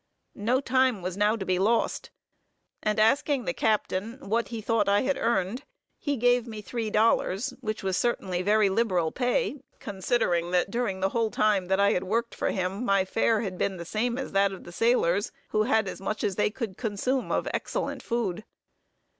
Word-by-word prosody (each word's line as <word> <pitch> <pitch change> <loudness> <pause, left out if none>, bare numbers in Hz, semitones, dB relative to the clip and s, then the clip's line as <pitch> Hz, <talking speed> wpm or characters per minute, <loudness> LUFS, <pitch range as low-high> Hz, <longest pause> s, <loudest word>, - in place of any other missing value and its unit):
No 240 +6 0
time 255 -7 +2
was 180 0 -3
now 210 +2 +2
to 200 -4 -5
be 185 -1 +1
lost, 225 +4 +1 0.7
and 215 0 0
asking 265 +4 +2
the - - -1
captain 215 +1 -1
what 230 +3 +1
he 230 -2 -5
thought 215 -2 +1
I 200 +1 +4
had 275 +1 +1
earned, 225 +3 0 0.4
he 285 -2 -1
gave 245 0 +3
me 220 -2 -6
three 225 +1 -4
dollars, 215 -1 +1
which 215 -4 -4
was 190 -1 0
certainly 190 -7 -1
very 210 +2 +3
liberal 190 -5 +1
pay, 270 - 0 0.2
considering 190 -4 0
that 180 +2 +1
during 210 -5 -2
the 190 - +2
whole 230 +1 0
time 210 -4 +1
that 190 +1 +1
I 200 0 +4
had 180 - 0
worked 230 +5 -1
for - - -1
him 190 +4 -2
my 195 -5 +2
fare 225 +2 +1
had 190 -5 -5
been 190 -2 0
the 170 - -7
same 235 +6 -1
as 265 - -4
that 195 0 +3
of 190 - -9
the 175 - -10
sailors, 205 -2 +2 0.2
who 215 - +1
had 215 -1 +2
as 185 - -6
much 215 +2 -3
as 200 -3 0
they 210 - +2
could 215 -4 -5
consume 245 +4 -1
of - - 0
excellent - - -3
food. 215 -5 -2
215 Hz, 195 wpm, -27 LUFS, 190-235 Hz, 0.7 s, I